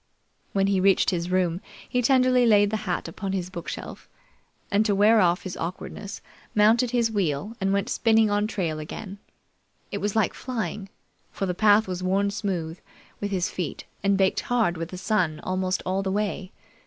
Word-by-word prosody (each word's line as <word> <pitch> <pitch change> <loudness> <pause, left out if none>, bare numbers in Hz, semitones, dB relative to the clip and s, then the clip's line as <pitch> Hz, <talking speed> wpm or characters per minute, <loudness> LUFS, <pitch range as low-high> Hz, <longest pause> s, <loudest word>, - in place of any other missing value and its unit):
When 195 -1 +2
he 195 -1 +2
reached 195 +1 +4
his 175 -1 -2
room, 180 -1 +1 0.3
he 250 - 0
tenderly 255 -1 +4
laid 205 -2 +5
the 220 - 0
hat 175 - -1
upon 190 +3 -5
his 185 -1 -3
bookshelf, 170 -3 -7 0.6
and 205 +2 +3
to 210 -2 +1
wear 215 +2 +5
off 175 0 +2
his 185 -1 -5
awkwardness, 195 +4 -6 0.3
mounted 225 +4 +4
his 235 -2 +1
wheel 200 +1 -1
and 195 0 +1
went 200 0 0
spinning 220 -2 +3
on 205 +1 +1
trail 170 -8 -2
again. 195 +6 -7 0.7
It - - -3
was 205 0 -2
like 220 -3 +2
flying, 220 -5 -4 0.4
for 195 - -3
the 180 - -1
path 210 +2 +4
was 185 -1 -4
worn 195 +2 +1
smooth 180 -5 -3 0.4
with 205 - -2
his 185 -2 -1
feet 175 -6 -4 0.2
and 200 0 +3
baked 190 -1 +2
hard 230 -8 +1
with 165 0 -5
the 185 - -7
sun 180 -6 0
almost 185 0 -1
all 190 +1 0
the 195 -1 -2
way. 200 -2 -2
195 Hz, 180 wpm, -25 LUFS, 185-215 Hz, 0.7 s, laid